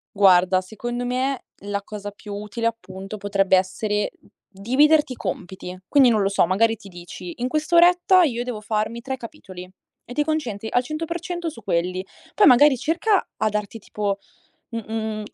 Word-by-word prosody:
Guarda, 185 -2 +5
secondo 240 +5 -5
me 255 +2 -1 0.2
la 200 0 -3
cosa 205 0 -7
più 205 0 -9
utile 210 +3 -3
appunto 195 -3 -6
potrebbe 195 -2 +2
essere 210 +3 -1 0.4
dividerti 265 +8 +3
i - - -10
compiti. 180 -4 -6
Quindi 275 -4 +5
non 220 -3 +2
lo 195 - +2
so, 195 - +3
magari 225 +6 +2
ti 205 -2 -15
dici 175 -1 -9
in 245 - -1
quest'oretta 345 +5 +4
io 240 -7 0
devo 245 -4 -5
farmi 215 +2 -2
3 265 +1 -4
capitoli 185 -6 -10 0.4
e 245 - -9
ti 295 - +1
concentri 245 -9 -3
al 245 - +2
100% 335 +4 -4
su 310 - -12
quelli. 185 -1 -1 0.3
Poi 420 - +5
magari 265 +1 +7
cerca 360 - +1
a 215 - +1
darti 210 +1 -4
tipo 205 -1 -3 0.5
mhmm 230 -2 -5
mhmm 220 -1 -3
220 Hz, 165 wpm, -23 LUFS, 200-265 Hz, 0.5 s, magari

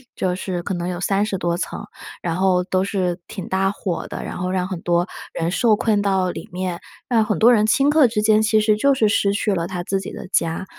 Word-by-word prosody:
就 185 -1 -1
是 180 -2 -4
可 195 - -3
能 175 -1 -3
有 180 0 -4
30 195 +1 0
多 170 -1 -1
层， - - -5 0.4
然 170 -1 -2
后 185 -1 +2
都 185 0 0
是 185 -3 -1
挺 190 - -7
大 190 +1 +1
火 190 -3 -4
的， - - -6
然 - - -6
后 180 0 -2
让 185 -1 0
很 185 -3 -4
多 175 0 +1 0.3
人 165 +1 -1
受 220 +3 +3
困 210 -1 +1
到 190 -2 +1
里 - - -8
面， 180 -1 -3 0.3
让 225 -3 +3
很 210 -4 -1
多 235 - +7
人 215 -3 +4
顷 275 +6 +3
刻 295 -3 +5
之 220 -2 -1
间 215 0 +4
其 215 0 +3
实 215 0 +2
就 280 +6 +3
是 220 -5 +2
失 200 -2 +2
去 205 0 0
了 170 -2 -1
他 180 -1 -4
自 195 +2 -1
己 190 - -7
的 - - -8
家。 170 0 0
190 Hz, 255 characters per minute, -21 LUFS, 180-215 Hz, 0.4 s, 多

